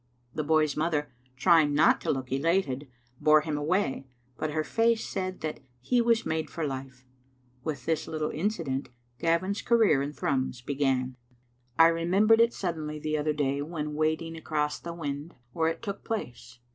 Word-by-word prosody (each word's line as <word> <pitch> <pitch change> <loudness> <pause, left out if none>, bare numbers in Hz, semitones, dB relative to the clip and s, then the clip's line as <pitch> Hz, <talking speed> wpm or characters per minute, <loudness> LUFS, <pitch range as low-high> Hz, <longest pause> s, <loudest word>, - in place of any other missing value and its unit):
The 155 - -2
boy's 155 -1 +2
mother, 150 -3 -1 0.2
trying 150 0 +4
not 150 - +5
to - - -3
look 130 -2 -4
elated, 145 -2 0 0.3
bore 155 0 +5
him 155 -1 -3
away, 150 -2 0 0.3
but 155 - -2
her 155 +1 -1
face 230 +5 +1
said 185 -1 -4
that 155 -1 -3 0.2
he 240 - +2
was 230 -1 +2
made 160 -1 -1
for 165 +1 -3
life. 130 -2 -6 0.6
With 140 -5 -4
this 160 -1 0
little 155 -1 -2
Digitized - - -5
by - - -11
VjOOQ - - -5
IC - - -3
incident 165 -11 -1 0.3
Gavin's 170 +5 +1
career 225 - +4
in 140 +1 -2
Thrums 130 -4 -1
began. 130 -2 0 0.6
I 165 0 +7
remem 175 +5 +2
bered 225 0 +7
it 230 +1 +5
suddenly 155 -5 -3
the 155 0 -2
other 150 0 0
day 140 -1 0
when 150 -1 -4
wading 160 +2 -1
across 150 -2 -2
the 170 - -6
wynd 145 0 -5 0.2
where 160 -1 +1
it 165 +5 -5
took 200 -3 -5
place. 125 - -5
155 Hz, 185 wpm, -28 LUFS, 145-170 Hz, 0.6 s, I